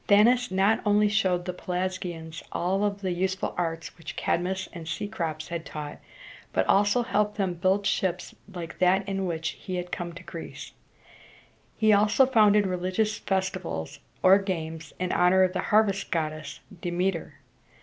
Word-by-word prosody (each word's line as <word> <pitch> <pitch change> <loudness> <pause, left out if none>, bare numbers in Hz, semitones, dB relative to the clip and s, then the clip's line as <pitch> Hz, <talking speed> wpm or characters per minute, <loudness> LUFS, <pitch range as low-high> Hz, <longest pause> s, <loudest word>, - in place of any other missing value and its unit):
Danaus 235 +5 +5
not 195 +4 +2
only 210 0 +4
showed 185 -4 +1
the 180 - -3
Pelasgians 180 -3 -4
all 195 +4 +1
the 200 -2 -4
useful 190 +2 -1
arts 165 -1 -3
which 150 -2 -7
Cadmus 190 +2 -1
and 165 -2 -8
Cecrops 170 -4 -4
had 170 -1 -4
taught, 150 -2 -7 0.5
but - - +2
also 205 +4 +3
helped 210 -3 0
them 190 -3 0
to 170 - -15
build 195 +2 +2
ships 180 -2 -1 0.2
like 170 -2 -7
that 190 +2 +3
in 195 -1 -1
which 165 -1 -2
he 185 - -6
had 180 0 -4
come 175 -1 -4
to 170 - -10
Greece. - - -8 1.1
He 215 -1 +4
also 210 +5 +5
founded 210 -5 +5
religious 185 +4 -1
festivals 185 - -2 0.2
or 190 +2 +7
games 160 -5 -4
in 185 -1 -2
honor 185 +1 +4
of 185 -1 +1
the 185 - -1
harvest 205 -2 +3
goddess, 155 -3 -3 0.2
De 175 - -2
me´ter. 175 -3 -1
185 Hz, 160 wpm, -27 LUFS, 170-205 Hz, 1.1 s, or